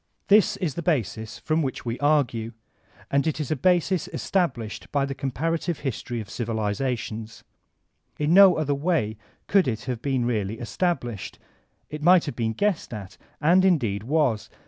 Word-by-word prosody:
This 210 0 +5
b 190 - -2
the 155 +3 -4
basis 115 - -1
from 155 +1 0
which 135 -3 -3
we 115 +1 -3
argue, 130 -6 +1 0.6
and 140 +3 +2
it 155 - 0
b 155 - -1
a - - +2 0.2
basb 175 0 -2
establbhed 125 - -2
by 140 -2 +1
the 140 - -4
comparative 160 +5 -2
hbtory 120 -3 -3
of 110 - -6
civilizations. 110 0 -3 0.7
In 150 +2 +1
no 195 -1 +8
other 150 -2 0
way 140 -8 0 0.3
could 195 -5 +3
it 110 -3 -2
have 125 -3 -4
been 130 -4 0
really 110 -3 -1
established. 120 - -3 0.5
It 150 0 -6
might 175 +2 +5
have 145 - -5
bttn 110 -2 -2
guessed 205 -4 0
at, 100 -3 -9 0.2
and 175 +5 +4
indeed 120 - +2
was. 125 -4 0
140 Hz, 160 wpm, -25 LUFS, 115-165 Hz, 0.7 s, no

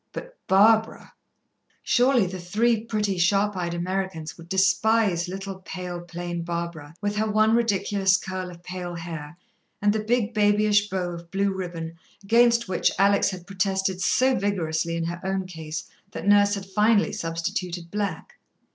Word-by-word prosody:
But - - -8
Barbara! 220 +3 +3 0.7
Surely 245 -3 +3
the 185 +1 -5
three 215 +6 +1
pretty, 210 -4 -1
sharp 200 +4 +2
eyed 175 -2 -2
Americans 180 -2 -3
would 170 0 -14
despise 190 -1 +2
little, 195 +1 -6
pale, 180 -2 -6
plain 175 0 -5
Barbara, 170 -3 -5
with 205 0 -2
her 215 +1 +1
one 215 +1 +3
ridiculous 200 -4 +2
curl 185 -1 -5
of 175 -1 -13
pale 180 -1 -6
hair, 165 -2 -7 0.4
and 205 0 +3
the 215 0 -1
big, 230 0 0
babyish 210 -1 +3
bow 185 -2 -2
of 170 0 -9
blue 195 +2 0
ribbon 170 -3 -6 0.2
against 235 +2 +4
which 185 - +2
Alex 200 +1 +4
had 180 -3 -7
protested 190 -1 -1
so 260 +6 +3
vigorously 170 -6 -1
in 165 - -2
her 170 +1 -4
own 190 0 -1
case 160 -3 -6 0.3
that - - -6
Nurse 205 0 +5
had 195 -1 -6
finally 210 +2 +2
substituted 170 +1 -4
black. 200 -5 -4
190 Hz, 155 wpm, -25 LUFS, 175-210 Hz, 0.7 s, Nurse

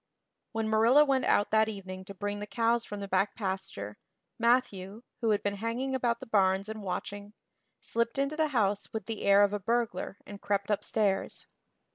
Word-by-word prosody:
When 225 -1 -1
Marilla 230 +7 +5
went 270 -2 +1
out 205 - +2
that 220 0 +4
evening 190 -2 -7
to 200 - -8
bring 205 +1 -3
the 205 - -5
cows 230 +1 +1
from 205 -1 -6
the 200 - -4
back 195 +1 +1
pasture, 190 - -4 0.4
Matthew, 230 -3 +1 0.2
who 230 - 0
had 210 -1 +2
been 205 0 -1
hanging 235 +5 -2
about 240 -2 0
the - - -8
barns 195 -3 +2
and 220 0 -6
watching, 205 +2 -5 0.5
slipped 235 +2 -1
into 275 +2 0
the 315 0 +2
house 210 -7 0
with 220 -3 -4
the 225 -2 -5
air 200 0 +6
of 205 0 +2
a 205 - -1
burglar 225 -3 -1
and 205 -1 -10
crept 200 0 -1
upstairs. 205 -1 0
210 Hz, 185 wpm, -30 LUFS, 200-235 Hz, 0.5 s, air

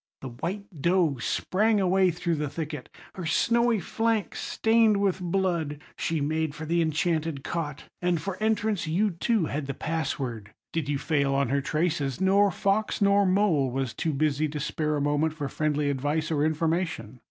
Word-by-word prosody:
The 130 - -5
white 175 - -4 0.2
doe 170 -4 +2
sprang 210 - +1
away 190 0 +3
through 170 0 -1
the 150 -2 -2
thicket, 150 -2 -5 0.2
her 180 -3 -5
snowy 235 +6 +2
flank 225 +2 -1
stained 225 -2 +3
with 195 -2 0
blood; 170 -5 -1 0.2
she 165 -1 -1
made 155 +1 -1
for 155 0 -6
the 170 +2 +1
enchanted 160 -2 0
cot, 150 -4 -4 0.2
and 175 -2 +1
for 195 +3 -4
entrance 215 -4 0
you 195 +6 +1
too 195 +2 +1
had 145 -1 -3
the 140 - -4
pass 160 -1 -2
word. 115 -6 -6 0.2
Did 160 -4 -2
you 145 - +1
fail 140 -2 +1
on 140 -3 +1
her 140 +1 +1
traces, 150 -2 -1
nor 195 +2 +4
fox 200 +3 0
nor 200 -1 +4
mole 185 -8 +3
was 130 -1 -2
too 160 - -1
busy 150 +1 +1
to 150 0 -5
spare 150 +1 -1
a - - -1
moment 145 +2 +1
for 145 -3 -3
friendly 150 0 0
advice 145 +4 -1
or 145 -2 +1
information. 160 - -1
160 Hz, 175 wpm, -27 LUFS, 145-190 Hz, 0.2 s, nor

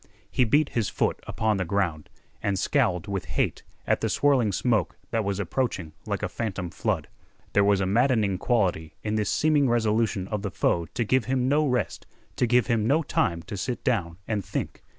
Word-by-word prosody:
He 130 - +3
beat 145 +6 +3
his 110 -5 -1
foot - - 0
upon 110 -2 0
the 95 - 0
ground, 85 -5 -1 0.3
and 100 -2 0
scowled 90 -1 +1
with 100 -2 -3
hate - - -1 0.2
at - - +1
the - - 0
swirling 135 -7 +3
smoke 110 - 0
that 115 -1 +1
was 100 -1 -2
approaching 95 -5 -2
like - - -2
a - - +1
phantom 100 -6 -4
flood. - - -1 0.5
There 100 - +5
was 100 -1 +3
a - - +1
maddening 105 -2 +2
quality 95 -10 0
in 105 - -1
this 110 -1 0
seeming 150 -4 +3
resolution 110 -4 +1
of 105 -2 -2
the 100 - -2
foe 85 -2 0
to 120 - -1
give 130 +1 +2
him 130 0 0
no 150 +2 +3
rest, 125 -2 -1 0.3
to 125 - +2
give 125 +1 +4
him 115 -2 +1
no 155 +6 +3
time 85 - 0
to 90 - -7
sit 120 +6 -3
down 85 -8 0
and 105 -3 -1
think. 100 +1 -4
105 Hz, 195 wpm, -26 LUFS, 95-125 Hz, 0.5 s, There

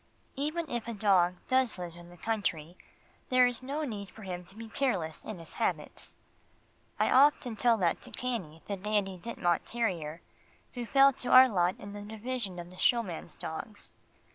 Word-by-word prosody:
Even 310 +4 -2
if 240 -4 -4
a 235 - -4
dog 185 -4 +3
does 260 -4 +2
live 175 -2 -6
in 175 0 -12
the 175 - -14
country, 175 -5 -2 0.5
there 255 -1 +6
is 245 0 0
no 280 +4 -3
need 205 -8 -5
for 220 - -13
him 180 -2 -5
to 195 - -18
be 225 +1 -8
careless 195 - -1
in 215 - -6
his 165 -1 -11
habits. - - -2 0.8
I - - +3
often 260 -3 +4
tell 235 +1 +3
that 175 -5 +1
to - - -10
Cannie 185 -11 -4
the 200 - -3
Dandie 195 -2 -1
Dinmont 175 -5 0
terrier, 175 -9 -2 0.5
who 245 -2 -5
fell 275 +4 +6
to 250 - -5
our 260 +1 +9
lot 180 -5 +1
in 205 0 -8
the 205 - -7
division 220 -2 -4
of 175 0 -8
the 185 - -14
showman's 225 -9 0
dogs. 160 +7 -7
210 Hz, 180 wpm, -30 LUFS, 175-245 Hz, 0.8 s, our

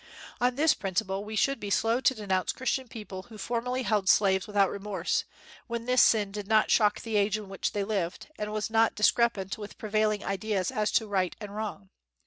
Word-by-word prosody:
On 245 0 +2
this 310 +3 +4
principle 195 0 -2
we 215 +1 -6
should 275 +6 +1
be 205 - -5
slow 225 +6 +2
to 260 - +3
denounce 190 -4 -1
Christian 260 0 -2
people 210 -5 -8
who 220 - -11
formerly 245 +4 -2
held 210 -5 +1
slaves 190 -2 +3
without 200 -2 +2
remorse, 200 0 -2 0.4
when 235 -1 -4
this 250 +1 +4
sin 210 -3 +4
did 205 -1 -6
not 215 0 +3
shock 210 -2 +3
the 225 -2 -1
age 205 +1 +2
in 210 -2 -9
which 195 - -2
they 205 - -1
lived, 195 -4 -2
and 210 0 -3
was 215 +1 -3
not 225 0 +3
discrepant 210 -1 +2
with 205 -1 -8
prevailing 215 -1 0
ideas 195 -1 -1
as 210 0 0
to 220 - +2
right 190 -3 0
and 205 -2 -8
wrong. 205 - -5
210 Hz, 200 wpm, -28 LUFS, 195-225 Hz, 0.4 s, this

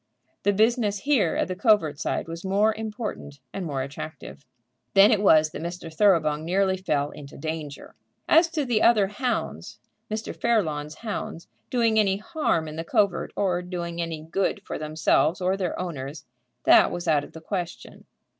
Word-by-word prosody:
The 205 - +3
business 215 0 +2
here 270 - +2
at - - 0
the 185 - -4
covert 180 - +2
side - - -2
was 165 +1 -7
more 200 +3 +2
important 215 - -6
and 190 -3 -4
more 135 -3 -2
attractive. 140 +1 -8 0.5
Then 200 +3 +8
it 210 -3 +3
was 155 -6 +5
that - - -7
Mr. 170 -1 -6
Thoroughbung 160 -6 +3
nearly 190 +3 +1
fell 150 -6 -1
into 145 -1 -11
danger. 155 -1 -6 0.3
As 330 +2 +5
to 315 -4 -2
the 235 -4 +1
other 215 -4 +5
hounds, 230 +4 -3 0.3
Mr. 220 +1 -4
Fairlawn's 155 -10 0
hounds, 205 -5 -5 0.2
doing 230 -5 +2
any 195 -2 +2
harm 210 - -1
in 155 +1 -7
the 165 - -3
covert, 195 +2 +1
or 180 -3 0
doing 170 -1 -4
any 165 -2 -4
good 170 +5 -1
for - - -5
themselves 155 +2 +1
or 185 +1 +1
their 185 -3 -3
owners, 150 -4 -5 0.4
that - - +6
was 175 0 -5
out 150 -3 +3
of - - -12
the 160 - -9
question. 175 -1 -6
180 Hz, 170 wpm, -25 LUFS, 155-210 Hz, 0.5 s, Then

